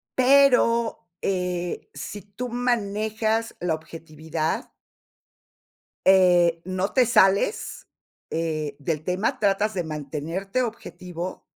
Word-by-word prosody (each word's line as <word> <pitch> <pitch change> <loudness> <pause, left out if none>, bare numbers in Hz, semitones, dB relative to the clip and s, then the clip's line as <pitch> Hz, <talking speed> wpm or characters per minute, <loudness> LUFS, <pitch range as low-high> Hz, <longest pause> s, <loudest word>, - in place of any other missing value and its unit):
Pero, 250 -5 +4
eh, 180 -2 -2
sí 205 -2 -7
tú 205 +6 -6
manejas 225 -1 -1
la 175 -2 0
objetividad. 160 0 -4 1.3
Eh, 175 -3 +5
no 185 +1 -2
te 255 -2 +5
sales, 210 - +2 0.4
eh, 155 -3 -2
del 150 +1 -2
tema, 185 +6 -1
tratas 205 +1 +1
de 180 -2 -2
mantenerte 160 - -3
objetivo. 180 -6 -6
190 Hz, 95 wpm, -24 LUFS, 165-220 Hz, 1.3 s, Eh